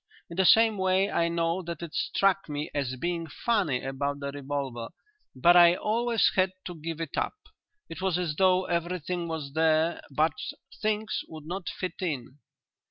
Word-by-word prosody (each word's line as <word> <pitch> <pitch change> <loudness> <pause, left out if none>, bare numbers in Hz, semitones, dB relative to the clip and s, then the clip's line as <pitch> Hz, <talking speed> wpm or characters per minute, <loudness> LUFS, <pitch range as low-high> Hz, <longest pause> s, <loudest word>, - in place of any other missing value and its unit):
In - - -6
the 190 - +3
same 220 +1 +6
way 190 +1 +2
I 170 - +2
know 170 +1 0
that 170 -2 -6
it 165 - -7
struck 195 -3 +1
me 150 +1 -4
as 135 -3 -1
being 170 +4 -2
funny 185 - 0
about 140 +1 -2
the 140 0 -4
revolver 135 -4 -4 0.5
but 170 +7 +5
I 175 0 +8
always 230 +3 +2
had 185 0 +2
to 180 - -5
give 165 0 -6
it 165 -3 -4
up. - - -1 0.5
It 165 - -8
was 190 -2 +1
as 170 -4 -2
though 185 +1 +3
everything 175 0 -2
was 155 -4 -5
there 160 +1 +2
but 150 +2 +2 0.5
things 215 0 0
would 155 -2 -10
not 180 +2 -4
fit 185 +1 -5
in." 145 -5 -4
170 Hz, 170 wpm, -28 LUFS, 150-185 Hz, 0.5 s, I